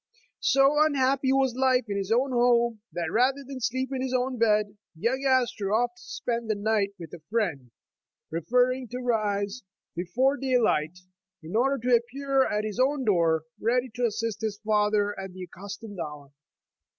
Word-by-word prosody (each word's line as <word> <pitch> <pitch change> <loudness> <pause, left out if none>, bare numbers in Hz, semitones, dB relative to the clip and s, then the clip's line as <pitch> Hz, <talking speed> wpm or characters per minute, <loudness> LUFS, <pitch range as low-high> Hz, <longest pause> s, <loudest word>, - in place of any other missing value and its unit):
So 275 +2 +4
unhappy 270 -2 +2
was 270 -2 +2
life 255 -1 +2
in 200 - -3
his 200 +1 -3
own 255 +4 +2
home, 235 -2 +2
that 170 -2 -3
rather 265 +4 +2
than 270 0 -7
sleep 260 +2 -1
in 260 - -2
his 260 -1 -1
own 250 0 -1
bed, 210 -2 +2 0.2
young 245 +11 -1
Astor 250 -6 +1
often 240 +2 +1
spent 235 -2 -4
the 215 - 0
night 205 -1 0
with 165 -4 -10
a 175 - -8
friend, 175 - -1 0.6
preferring 250 +9 +1
to 245 - -6
rise 215 -2 -1 0.3
before 250 +12 +1
daylight, 225 - +1 0.5
in 165 +6 -7
order 270 +4 +2
to 250 - +6
appear 270 +3 +1
at 210 0 -1
his 215 +2 -4
own 265 +1 +2
door, 165 -6 +2 0.2
ready 250 +3 +1
to 245 0 +1
assist 225 0 -3
his 215 -2 -2
father 210 -1 +2
at 190 -1 -7
the 185 0 -8
accustomed 200 +3 -9
hour. 150 -3 -7
230 Hz, 165 wpm, -27 LUFS, 205-260 Hz, 0.6 s, to